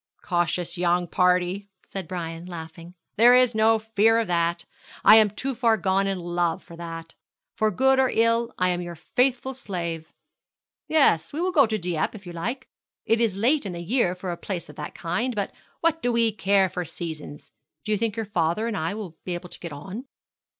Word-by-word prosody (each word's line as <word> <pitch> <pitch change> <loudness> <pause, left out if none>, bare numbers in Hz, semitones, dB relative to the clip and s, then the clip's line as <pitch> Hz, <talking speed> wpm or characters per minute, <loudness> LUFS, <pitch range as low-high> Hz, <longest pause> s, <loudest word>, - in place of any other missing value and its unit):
'Cautious 175 0 -1
young 175 0 +2
party,' 180 +3 +1 0.2
said 190 -4 -6
Brian, 170 -1 -5
laughing. 165 0 -9 0.2
'There 240 +3 +7
is 250 -1 +5
no 220 +1 +4
fear 220 0 +3
of 230 - +1
that. 170 -1 0 0.4
I 215 - +9
am 215 -1 +6
too 265 +7 -3
far 230 -2 +2
gone 195 0 +1
in 195 -1 -1
love 175 -1 -1
for 170 - -12
that. 165 -1 -8 0.4
For 215 - +2
good 265 +3 +3
or 260 -1 +4
ill 230 +1 +2
I 185 0 +2
am 180 0 -1
your 175 -1 -6
faithful 255 - 0
slave. 170 - -5 0.8
Yes, 220 - +3
we 295 - -5
will 365 +2 +1
go 280 -8 +5
to 220 0 -1
Dieppe 175 0 -2
if 200 -2 -11
you 175 - -8
like. 235 +11 -4 0.4
It 225 +1 +2
is 225 -5 +1
late 255 +9 +2
in 195 -4 -5
the 170 0 -6
year 185 -2 +1
for 180 0 -5
a 170 - -4
place 175 -5 -5
of 150 - -12
that 150 - -6
kind; 235 +9 -2
but 200 -2 -2 0.3
what 325 0 +1
do 245 - +1
we 230 -1 +2
care 195 -1 +2
for 180 0 -4
seasons? 155 -3 -7 0.3
Do 215 - -2
you 210 - +3
think 225 -2 -1
your 225 - -2
father 190 +2 0
and 230 - -2
I 165 +4 -2
will 185 -7 -8
be 180 - -3
able 175 +1 -8
to - - -6
get 170 - -7
on?' 190 - -7
190 Hz, 205 wpm, -25 LUFS, 170-230 Hz, 0.8 s, I